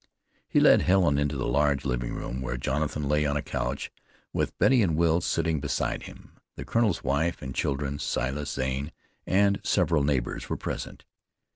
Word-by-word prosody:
He - - +3
led - - +6
Helen 90 -7 +3
into 70 0 0
the 65 - -2
large 70 -1 +2
sitting 60 -3 -2
room 65 +2 -5
where 65 -1 -3
Jonathan 75 +3 -2
lay 75 +1 +2
on 75 -1 0
a 70 - -3
couch, 65 +1 -3 0.4
with - - -1
Betty 130 -2 +4
and 85 -7 +2
Will 85 +1 +3
sitting 80 -2 0
beside 70 -1 -2
him. - - -14 0.2
The - - -7
colonel's 115 -6 +1
wife 75 +5 0
and 65 -1 -5
children, 70 +1 -2
Silas 70 +2 -2
Zane, 65 +3 -2 0.3
and 100 +1 +3
several 80 -4 +2
neighbors, 70 -4 -1
were - - -1
present. - - -6
70 Hz, 170 wpm, -27 LUFS, 65-80 Hz, 0.4 s, led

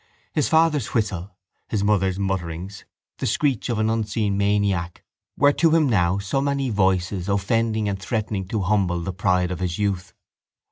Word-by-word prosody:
His 150 - +1
father's 160 -4 +2
whistle, 100 -4 -2 0.3
his 105 -3 -1
mother's 95 -3 +2
mutterings, 95 0 -4 0.3
the - - -1
screech 135 -5 0
of 115 - 0
an 110 0 +1
unseen 105 -2 -1
maniac 100 -4 0 0.3
were 145 +1 +5
to 165 +2 +3
him 160 -3 +4
now 90 -6 +2
so 100 +8 -1
many 140 -2 0
voices 95 -1 0
offending 110 +2 +1
and 100 -1 -2
threatening 105 -2 -2
to 105 +1 -2
humble 95 -3 +1
the 95 +2 -4
pride 90 -2 +1
of 90 - -4
his 90 -2 -2
youth. 95 -3 -2
100 Hz, 160 wpm, -23 LUFS, 95-110 Hz, 0.3 s, were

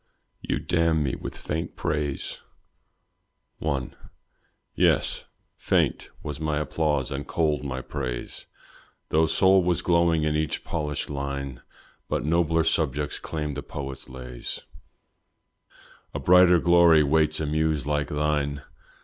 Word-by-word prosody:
"You - - -1
damn 85 -2 +1
me 70 - -1
with - - -6
faint 80 +3 -4
praise." 75 -4 -2 1.2
I. 70 -4 -1 0.8
Yes, - - +2 0.3
faint - - +1
was 75 -1 -5
my 75 -1 -1
applause 75 -3 0
and 70 +1 -4
cold 75 -3 0
my 65 -2 -3
praise, 65 -5 -5 0.6
Though 80 +1 +3
soul 95 +2 +5
was 90 -1 +1
glowing 85 -2 +3
in 75 0 +1
each 80 0 -1
polished 75 -2 -3
line; 70 -2 -4 0.5
But - - -1
nobler 80 0 +2
subjects 75 -3 0
claim 75 -2 -4
the 70 - -4
poet's 70 -2 -7
lays, 60 -1 -7 1.5
A - - -1
brighter 90 0 +6
glory 85 -2 +6
waits 75 +1 +2
a 80 - -1
muse 75 -2 0
like 75 -1 0
thine. 75 -1 -1
75 Hz, 125 wpm, -26 LUFS, 70-80 Hz, 1.5 s, brighter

